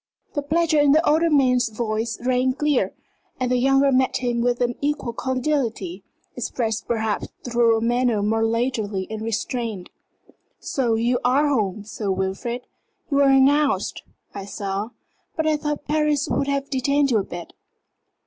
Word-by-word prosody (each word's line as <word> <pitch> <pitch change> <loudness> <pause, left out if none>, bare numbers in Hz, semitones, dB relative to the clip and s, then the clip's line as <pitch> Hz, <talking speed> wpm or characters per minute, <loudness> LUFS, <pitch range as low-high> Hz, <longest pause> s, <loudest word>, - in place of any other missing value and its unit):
The 290 - -1
pleasure 310 +1 +2
in 290 -1 +5
the 315 +2 +3
older 325 +3 +3
man's 250 -5 +3
voice 220 0 -2
rang 255 0 +2
clear, 295 0 +1 0.5
and 250 -1 -1
the 250 - +3
younger 270 +2 +4
met 260 0 +2
him 240 -2 -1
with 245 0 +1
an 245 0 +1
equal 285 -4 -1
cordiality, 250 - -2 0.3
expressed 225 -3 -2
perhaps 220 -3 -1 0.2
through 235 -2 +3
a - - -2
manner 240 -2 +1
more 225 +2 +1
leisurely 225 -4 -1
and 215 0 -4
restrained. 225 -3 -3 0.7
"So 240 -5 0
you 240 +2 +1
are 270 +4 +3
home, 210 -6 0
Sir 210 -1 -5
Wilfrid? 195 +6 -3 0.5
You 280 - +2
were 280 -1 +5
announced, 275 +2 +3 0.3
I 200 -1 -6
saw. 200 +1 -4 0.5
But 315 - -1
I 310 -1 +3
thought 295 -1 -3
Paris 300 -1 +1
would 280 - 0
have 280 0 -2
detained 280 +1 +1
you 225 - +4
a - - -1
bit." 175 -2 -8
245 Hz, 160 wpm, -23 LUFS, 225-280 Hz, 0.7 s, in